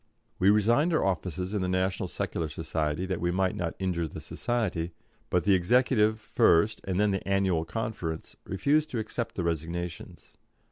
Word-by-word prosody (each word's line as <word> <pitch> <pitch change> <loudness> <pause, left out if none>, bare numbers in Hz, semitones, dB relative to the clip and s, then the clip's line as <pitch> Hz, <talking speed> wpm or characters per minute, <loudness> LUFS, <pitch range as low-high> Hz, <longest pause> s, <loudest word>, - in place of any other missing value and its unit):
We 95 - +5
resigned 115 - +4
our 155 - +2
offices 90 0 -2
in 105 - 0
the 90 - -1
National 95 0 0
Secular 80 -2 -3
Society 80 +1 -2
that 95 -1 -3
we 85 - +1
might 95 +2 +1
not 90 -5 -3
injure 90 -3 -1
the - - -8
society, 90 -9 -2 0.4
but 90 - +2
the 100 - +4
executive 110 +3 +3
first, 105 -1 +3
and 95 -1 -1
then 105 0 +3
the 95 0 -3
Annual 95 -4 +2
Conference, 90 -5 -4
refused 145 - +1
to 125 - -3
accept 110 +2 -3
the 90 - -2
resignations. 85 +1 -4
95 Hz, 170 wpm, -28 LUFS, 85-105 Hz, 0.4 s, We